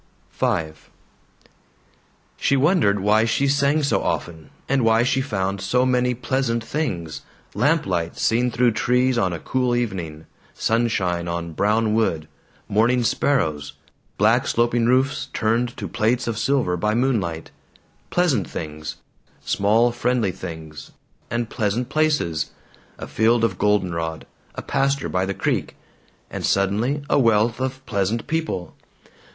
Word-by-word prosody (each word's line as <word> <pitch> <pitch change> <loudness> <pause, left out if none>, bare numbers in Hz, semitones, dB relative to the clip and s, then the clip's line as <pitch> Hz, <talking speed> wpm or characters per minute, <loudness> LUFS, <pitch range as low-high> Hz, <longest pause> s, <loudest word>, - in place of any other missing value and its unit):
V - - 0 1.9
She 140 - +1
wondered 135 - +3
why 105 +2 +3
she 140 +5 +1
sang 140 +2 +2
so 140 - +1
often, 80 -3 -3 0.2
and 135 -2 +1
why 115 +1 +4
she 130 +2 +1
found 100 -6 -2
so 125 +7 +1
many 125 -1 +1
pleasant 125 -2 -1
things 90 - -3 0.3
lamplight 100 - 0
seen 120 +2 +2
though 120 0 +2
trees 125 +2 +1
on 95 -2 +1
a 85 - -3
cool 125 +6 0
evening, 85 -10 -3 0.3
sunshine 100 -7 0
on 85 0 -3
brown 105 +4 +1
wood, 85 -9 0 0.4
morning 120 +4 +2
sparrows, 80 - 0 0.4
black - - +3
sloping 120 0 +1
roofs 135 +3 +1
turned 115 +2 0
to - - -4
plates 120 +2 0
of 115 -2 -2
silver 135 -10 +1
by 105 +5 0
moonlight. 105 -11 -1 0.6
Pleasant 150 - +1
things, 75 -1 -6 0.5
small 110 +4 +3
friendly 120 -4 0
things, 80 -4 -9 0.4
and 120 0 -1
pleasant 115 +1 -2
places 145 - 0 0.5
a - - -6
field 115 +2 +2
of 95 -6 0
goldenrod, 85 -6 0 0.3
a - - -6
pasture 140 0 0
by 95 +1 0
the 100 - -3
creek - - -1 0.6
and - - -5
suddenly 110 +9 +1
a - - +3
wealth 115 -1 +3
of 130 0 -4
pleasant 100 +3 -1
people. 160 - -3
115 Hz, 130 wpm, -22 LUFS, 95-125 Hz, 1.9 s, why